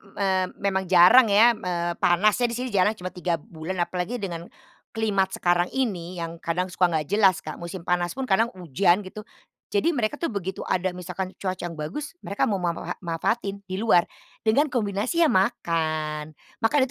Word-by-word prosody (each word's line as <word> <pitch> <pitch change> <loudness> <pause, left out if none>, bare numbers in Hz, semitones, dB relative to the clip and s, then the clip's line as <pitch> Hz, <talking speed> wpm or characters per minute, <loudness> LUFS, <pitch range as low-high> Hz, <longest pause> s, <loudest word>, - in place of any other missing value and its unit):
eee, 190 -2 +1 0.2
memang 190 -2 0
jarang 185 +7 +7
ya 215 +4 +6
m - - -15
eee, 175 -1 -1
panasnya 210 +7 +3
di 235 - -4
sini 250 +1 -3
jarang 200 +2 +3
cuma 185 -3 -6
3 180 -1 -1
bulan. 165 +4 -7
Apalagi 180 +7 -3
dengan, 170 -3 -5 0.5
climate 200 -4 0
sekarang 175 0 +2
ini 185 -9 -2
yang 165 0 -4
kadang 180 +2 -1
suka 180 0 +3
nggak 155 -2 -1
jelas, 195 -3 +4
Kak. 155 - -6
Musim 170 +2 -6
panas 175 -1 +1
pun 270 - -3
kadang 225 +4 +2
hujan 180 - +1
gitu, 210 +3 -9 0.5
jadi 205 +10 +1
mereka 245 +3 -1
tuh 335 - 0
begitu 190 -3 -5
ada 185 0 0
misalkan 180 +1 -5
cuaca 185 -2 -3
yang 170 -2 -6
bagus 285 - -5
mereka 200 - -3
mau 200 -3 +1
ma 170 -1 -1
ma - - -7
ha - - -3
manfaatin 195 +4 -2
di 185 -1 -5
luar, 215 -6 +4 0.4
dengan 250 +8 +3
kombinasi, 240 - 0
ya 315 - +4
makan. 155 -6 -1 0.2
Makan 250 +7 +2
185 Hz, 185 wpm, -25 LUFS, 175-215 Hz, 0.5 s, jarang